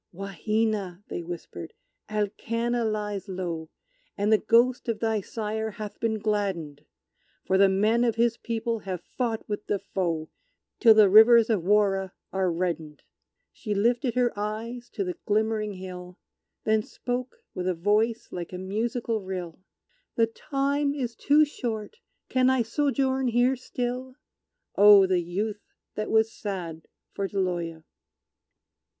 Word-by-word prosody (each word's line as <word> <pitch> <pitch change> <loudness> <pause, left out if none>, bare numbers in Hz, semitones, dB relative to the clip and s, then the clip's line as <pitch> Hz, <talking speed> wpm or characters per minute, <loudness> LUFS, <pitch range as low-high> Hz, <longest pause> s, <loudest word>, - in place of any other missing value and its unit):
"Wahina," 195 +1 -2
they - - -4
whispered, 170 -1 -8 0.3
"Alkanna 230 +3 -1
lies 210 -1 -3
low, 170 -4 -4 0.5
And 205 +2 +2
the 215 - +5
ghost 240 +2 +3
of 220 -2 -1
thy 220 -2 0
sire 220 +1 -3
hath 215 -1 -8
been 225 -1 0
gladdened, 190 -9 -2 0.6
For 190 - +1
the 195 0 +6
men 215 +5 +2
of 230 -2 +1
his 230 0 +2
people 230 -1 -3
have 190 -3 -5
fought 230 -3 -3
with 205 0 -4
the 205 - +1
foe 170 -5 -3 0.5
Till 225 -3 +7
the 215 -2 +7
rivers 225 +3 +7
of 210 -5 +2
Warra 195 -1 +2 0.2
are 190 -2 +1
reddened!" 165 -3 -3 0.5
She 210 -3 -4
lifted 240 +4 +1
her 245 -1 +2
eyes 225 +4 -4
to 205 - -1
the 180 -1 -4
glimmering 215 0 +1
hill, 180 -1 -9 0.5
Then 220 0 +2
spoke, 245 +3 -4 0.2
with 180 0 -3
a 185 - +1
voice 210 +6 +1
like 175 -1 -6
a 180 - -5
musical 220 +4 -2
rill, 185 -3 -6 0.6
"The 230 - +4
time 280 +4 -1
is 245 -5 -3
too 295 +5 +4
short; 235 - -5 0.3
can 255 0 +3
I 260 -2 +3
sojourn 265 +1 0
here 245 +2 +3
still?" 255 +1 -4 0.6
Oh, 205 -1 +8
the 185 -1 +2
Youth 205 +5 -3 0.3
that 215 - -3
was 220 0 +3
sad 175 -6 -6 0.3
for 200 - -2
Deloya! 175 -4 -2
215 Hz, 140 wpm, -26 LUFS, 190-235 Hz, 0.6 s, Oh